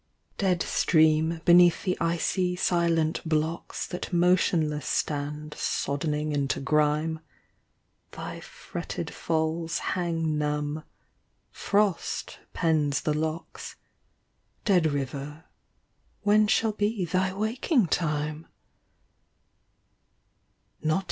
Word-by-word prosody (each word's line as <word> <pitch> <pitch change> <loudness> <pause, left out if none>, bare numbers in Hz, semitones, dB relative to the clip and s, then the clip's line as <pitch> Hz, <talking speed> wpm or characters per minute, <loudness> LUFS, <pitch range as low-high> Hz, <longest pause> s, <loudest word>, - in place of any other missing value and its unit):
Dead 185 -3 +2
stream 160 0 +3
beneath 175 -1 +6
the 185 - 0
icy 180 +2 0
silent 170 -3 +1
blocks 160 +1 -2
That 180 - -6
motionless 170 -5 +2
stand 150 +1 -2
soddening 150 +1 -1
into 140 -2 0
grime, 150 +3 +1 0.9
Thy - - -7
fretted - - -6
l^s 160 0 -1 0.2
hang 165 -4 -1
numb, 150 +1 -2 0.7
frost 200 -3 -1
pens 155 -4 +1
the 150 - 0
locks; 160 +2 -4 0.9
Dead 180 -5 +4
river, 145 +3 -4 0.8
when 210 +1 +4
shall 220 +1 +2
be 205 -2 -1
thy 185 +2 0
waking 220 - +1
time 150 -1 -1
160 Hz, 85 wpm, -27 LUFS, 150-180 Hz, 0.9 s, beneath